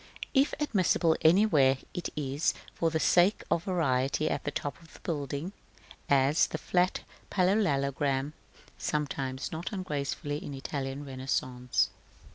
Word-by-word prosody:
If 275 Hz, 0 st, +3 dB
admissible 185 Hz, -, +2 dB
anywhere, 160 Hz, -7 st, +5 dB, 0.2 s
it 180 Hz, -2 st, -3 dB
is 145 Hz, +1 st, 0 dB, 0.2 s
for 165 Hz, -, +1 dB
the 160 Hz, 0 st, -1 dB
sake 180 Hz, +6 st, +4 dB
of 170 Hz, -, +1 dB
variety 150 Hz, -4 st, +1 dB
at -, -, -2 dB
the -, -, +1 dB
top 145 Hz, +1 st, -4 dB
of 165 Hz, -, -17 dB
the -, -, -13 dB
building, 150 Hz, +2 st, -3 dB, 0.6 s
as 140 Hz, +2 st, +4 dB
the -, -, -4 dB
flat 180 Hz, 0 st, +1 dB, 0.3 s
parallelogram 145 Hz, -7 st, +1 dB, 0.5 s
sometimes 135 Hz, -3 st, -2 dB
not 160 Hz, +2 st, -4 dB
ungracefully 150 Hz, -5 st, -3 dB
in 140 Hz, -, -6 dB
Italian 135 Hz, +1 st, -4 dB
Renaissance. 130 Hz, -2 st, -1 dB
150 Hz, 125 wpm, -30 LUFS, 135-175 Hz, 0.6 s, anywhere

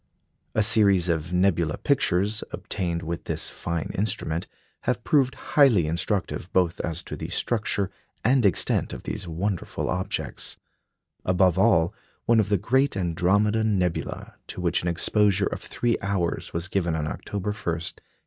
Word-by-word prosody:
A 110 Hz, -, +4 dB
series 100 Hz, -5 st, +4 dB
of 85 Hz, 0 st, -1 dB
nebula 90 Hz, -4 st, +2 dB
pictures, 105 Hz, -6 st, +1 dB
obtained 85 Hz, -2 st, -3 dB
with 85 Hz, +1 st, -4 dB
this -, -, -2 dB
fine 85 Hz, -3 st, -3 dB
instrument, 95 Hz, -5 st, -2 dB, 0.4 s
have 125 Hz, -2 st, 0 dB
proved 135 Hz, -4 st, +2 dB, 0.2 s
highly 125 Hz, -, +6 dB
instructive 90 Hz, +2 st, -2 dB
both 90 Hz, -2 st, +2 dB
as 85 Hz, 0 st, -2 dB
to -, -, -6 dB
the -, -, -6 dB
structure 105 Hz, -4 st, -1 dB, 0.3 s
and 130 Hz, +1 st, +4 dB
extent 100 Hz, -5 st, +2 dB
of -, -, -7 dB
these -, -, -4 dB
wonderful 90 Hz, +3 st, -2 dB
objects; 90 Hz, +1 st, -2 dB, 0.7 s
above 90 Hz, -1 st, +3 dB
all, 85 Hz, +4 st, +4 dB, 0.3 s
one 115 Hz, -1 st, +4 dB
of 105 Hz, -2 st, +1 dB
the 100 Hz, -, +3 dB
great 130 Hz, +5 st, +1 dB
Andromeda 100 Hz, +5 st, +2 dB
nebula, 95 Hz, -6 st, -1 dB
to -, -, -7 dB
which -, -, +1 dB
an 90 Hz, -, -3 dB
exposure 100 Hz, +3 st, +2 dB
of -, -, -3 dB
three 120 Hz, -2 st, -1 dB
hours 100 Hz, -4 st, -1 dB
was 85 Hz, +1 st, -2 dB
given 85 Hz, -3 st, 0 dB
on 75 Hz, -1 st, -1 dB
October 100 Hz, +5 st, -3 dB
1, -, -, -3 dB
1888. 85 Hz, -4 st, -3 dB
95 Hz, 150 wpm, -25 LUFS, 85-105 Hz, 0.7 s, highly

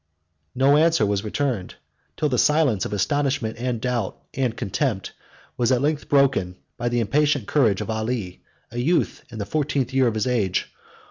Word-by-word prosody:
113 135 Hz, +2 st, +2 dB
No 145 Hz, +2 st, +6 dB
answer 165 Hz, -9 st, +3 dB
was 100 Hz, 0 st, 0 dB
returned, 110 Hz, -3 st, -2 dB, 0.4 s
till 150 Hz, -, +1 dB
the 125 Hz, -4 st, 0 dB
silence 150 Hz, -, +3 dB
of -, -, -5 dB
astonishment, 130 Hz, +1 st, 0 dB
and 125 Hz, -1 st, -2 dB
doubt, 120 Hz, -4 st, -2 dB, 0.2 s
and 125 Hz, -3 st, -1 dB
contempt, 105 Hz, -1 st, -2 dB, 0.4 s
was 120 Hz, +1 st, +2 dB
at 125 Hz, -, +3 dB
length 150 Hz, 0 st, -1 dB
broken 135 Hz, -11 st, +2 dB, 0.2 s
by 120 Hz, -1 st, -2 dB
the 120 Hz, 0 st, 0 dB
impatient 140 Hz, +2 st, +1 dB
courage 115 Hz, -10 st, +2 dB
of -, -, -5 dB
Ali, 110 Hz, -4 st, -3 dB, 0.3 s
a 120 Hz, -, -4 dB
youth 165 Hz, +8 st, 0 dB
in 115 Hz, -, -9 dB
the 100 Hz, -, -3 dB
fourteenth 140 Hz, +1 st, -1 dB
year 130 Hz, -1 st, +4 dB
of 115 Hz, -, -1 dB
his 110 Hz, -, 0 dB
age. 110 Hz, -8 st, 0 dB
125 Hz, 180 wpm, -23 LUFS, 110-140 Hz, 0.4 s, No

